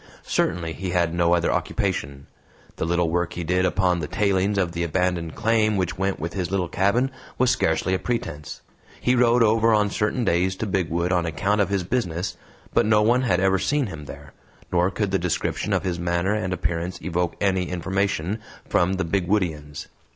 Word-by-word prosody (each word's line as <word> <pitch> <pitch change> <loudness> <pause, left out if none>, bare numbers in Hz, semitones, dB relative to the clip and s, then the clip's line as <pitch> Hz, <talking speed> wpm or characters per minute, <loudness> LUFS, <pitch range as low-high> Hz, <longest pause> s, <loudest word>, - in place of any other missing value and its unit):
Certainly 80 -1 0
he 95 +1 -5
had 85 -2 +1
no 85 0 +3
other 85 - +1
occupation; 70 0 -2 0.5
the - - -1
little 85 -1 +1
work 85 0 0
he 85 - -4
did 90 +2 +1
upon 90 -1 +2
the 75 - -3
tailings 100 +2 +1
of 90 -3 +1
the 85 0 -2
abandoned 85 -1 -1
claim 110 -2 +2
which 90 -1 -1
went 95 0 -1
with 85 +3 -4
his 90 -4 -2
little 95 -2 0
cabin 115 +10 +1 0.3
was 125 -1 +3
scarcely 80 +3 +1
a 95 - +1
pretense. 75 -11 -4 0.4
He 125 - +2
rode 120 -1 +4
over 115 +1 +4
on 105 -1 +2
certain 110 +5 0
days 95 +1 +1
to 110 - -3
Bigwood 90 -3 0
on 90 -2 +1
account 100 +7 +1
of 100 - +1
his 100 -2 0
business, 90 -4 -2 0.4
but - - +3
no 105 -1 +4
one 120 +4 +3
had 95 -9 +2
ever 95 0 +3
seen 145 +4 +1
him 80 -8 -7
there, 70 0 -11 0.4
nor 90 +1 +3
could 100 0 -2
the 95 - +2
description 90 -1 -1
of - - +1
his 90 -2 -2
manner 85 +3 0
and 105 -4 -2
appearance 85 0 -2
evoke 90 0 -1
any 95 -3 +1
information 95 +2 -1 0.3
from 90 +2 +2
the 95 -1 -1
Bigwoodians. 85 -5 -1
90 Hz, 190 wpm, -24 LUFS, 85-100 Hz, 0.5 s, rode